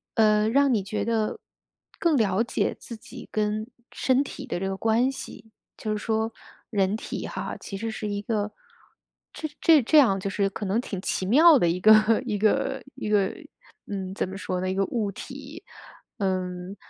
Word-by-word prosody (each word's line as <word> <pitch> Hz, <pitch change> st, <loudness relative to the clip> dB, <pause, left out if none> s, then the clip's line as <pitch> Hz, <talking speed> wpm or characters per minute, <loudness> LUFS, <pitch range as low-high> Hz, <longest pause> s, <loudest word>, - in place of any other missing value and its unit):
呃， 215 Hz, -1 st, +4 dB
让 275 Hz, +1 st, +4 dB
你 205 Hz, -4 st, +1 dB
觉 210 Hz, +2 st, -3 dB
得， 225 Hz, -2 st, -1 dB, 0.6 s
更 335 Hz, -5 st, +3 dB
了 210 Hz, -2 st, +2 dB
解 235 Hz, -, -1 dB
自 230 Hz, -, -8 dB
己 245 Hz, -, -11 dB
跟 215 Hz, 0 st, -1 dB, 0.2 s
身 260 Hz, +1 st, +2 dB
体 275 Hz, 0 st, -8 dB
的 235 Hz, -, -3 dB
这 195 Hz, -, -2 dB
个 195 Hz, -, -2 dB
关 230 Hz, +5 st, +2 dB
系？ 220 Hz, -4 st, -10 dB, 0.3 s
就 215 Hz, -, -3 dB
是 215 Hz, -, 0 dB
说 220 Hz, +1 st, -1 dB, 0.4 s
人 200 Hz, -1 st, +1 dB
体 -, -, -5 dB
哈， -, -, -5 dB
其 195 Hz, -, -7 dB
实 225 Hz, +3 st, -3 dB
是 215 Hz, -1 st, -4 dB
一 205 Hz, 0 st, -2 dB
个， 210 Hz, -1 st, -2 dB, 0.8 s
这 310 Hz, -, -5 dB
这 320 Hz, -3 st, +6 dB
这 300 Hz, +6 st, +3 dB
样 215 Hz, -9 st, +5 dB
就 195 Hz, -, -3 dB
是 195 Hz, 0 st, 0 dB
可 205 Hz, -, -5 dB
能 200 Hz, +5 st, +1 dB
挺 195 Hz, -6 st, -5 dB
奇 190 Hz, -, -1 dB
妙 300 Hz, -, +7 dB
的 175 Hz, -, +2 dB
一 175 Hz, +2 st, -1 dB
个 215 Hz, +2 st, +6 dB
一 210 Hz, -, -1 dB
个 215 Hz, +1 st, +1 dB
一 240 Hz, -, -5 dB
个， 200 Hz, -2 st, +2 dB, 0.5 s
嗯， 190 Hz, -2 st, -4 dB
怎 195 Hz, -, -2 dB
么 190 Hz, -, -7 dB
说 185 Hz, -2 st, -3 dB
呢， 185 Hz, -, -1 dB
一 190 Hz, -, -1 dB
个 195 Hz, -, +2 dB
物 215 Hz, -2 st, -1 dB
体。 -, -, -9 dB, 0.6 s
嗯， 185 Hz, 0 st, -2 dB
215 Hz, 200 characters per minute, -26 LUFS, 195-230 Hz, 0.8 s, 妙